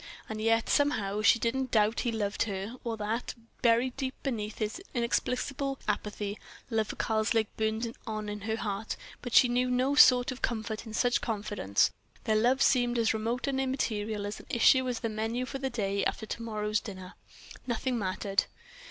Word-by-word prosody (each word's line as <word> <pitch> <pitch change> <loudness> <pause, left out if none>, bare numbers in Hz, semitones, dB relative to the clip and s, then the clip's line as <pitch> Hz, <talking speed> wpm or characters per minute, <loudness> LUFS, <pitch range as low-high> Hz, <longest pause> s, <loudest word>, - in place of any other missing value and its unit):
And 215 0 -5
yet, 225 0 +2
somehow, 210 -8 +1
she 215 - +6
didn't 255 +3 -1
doubt 215 0 +3
he 240 - 0
loved 210 -2 -2
her 200 +2 -4
or 230 -2 -3
that, 220 +3 -3 0.3
buried 240 +2 +3
deep 265 -1 -3
beneath 220 -5 -2
this 215 - -3
inexplicable 260 +3 -1
apathy, 210 0 -2 0.3
love 220 -1 +1
for - - -5
Karslake 220 -1 0
burned 220 +2 -1
on 215 -1 -3
in 210 0 -5
her 220 +2 -1
heart; 210 -1 -3 0.3
but 245 -1 -4
she 250 - +8
knew 250 +1 +1
no 255 +3 +2
sort 250 -3 +7
of 255 - -8
comfort 220 -1 -2
in 220 - -6
such 245 +1 +2
confidence, 205 - 0 0.3
their 220 -2 +1
love 245 +5 +3
seemed 245 -2 +3
as 230 -1 +3
remote 230 +3 -1
and 270 -1 0
immaterial 220 -6 -1
an 205 - -3 0.2
issue 260 +2 +5
as 245 - -3
the 230 - 0
menu 225 +3 -2
for 270 +1 -5
day 210 -7 -1
after 220 - -1
to 230 - -5
morrow's 215 -2 -1
dinner. 185 -3 -9 0.5
Nothing 245 +1 -1
mattered! 195 0 0
225 Hz, 175 wpm, -30 LUFS, 210-250 Hz, 0.5 s, she